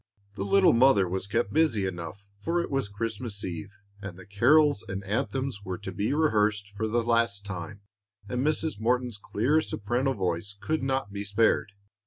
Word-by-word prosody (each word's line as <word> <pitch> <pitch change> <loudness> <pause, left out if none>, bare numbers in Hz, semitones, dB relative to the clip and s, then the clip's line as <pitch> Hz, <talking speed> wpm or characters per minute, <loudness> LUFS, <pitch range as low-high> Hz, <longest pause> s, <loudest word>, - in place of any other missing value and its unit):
The 100 - -4
little 190 - +5
mother 115 -6 +5
was 95 +2 -3
kept 115 +4 -1
busy 140 -11 +2
enough, 95 +2 -6
for 165 +11 0
it 170 - -3
was 135 -7 -1
Christmas 105 0 -4
eve, 95 +3 -6 0.2
and 95 -2 -7
the 95 - -12
carols 140 - +4
and 95 +1 -4
anthems 110 +4 -2
were 95 -2 -4
to 95 -1 -7
be 100 +3 -1
rehearsed 105 -9 +2
for 110 +2 -1
the 115 +2 +1
last 115 -3 +1
time, 100 +1 -6 0.5
and 125 +5 -1
Mrs. 155 -5 0
Morton's 120 -1 0
clear 130 +10 +1
soprano 125 +3 -1
voice 95 -1 -2
could 120 +10 -1
not 130 -6 -1
be 100 0 -3
spared. 105 0 +2
105 Hz, 175 wpm, -27 LUFS, 100-130 Hz, 0.5 s, little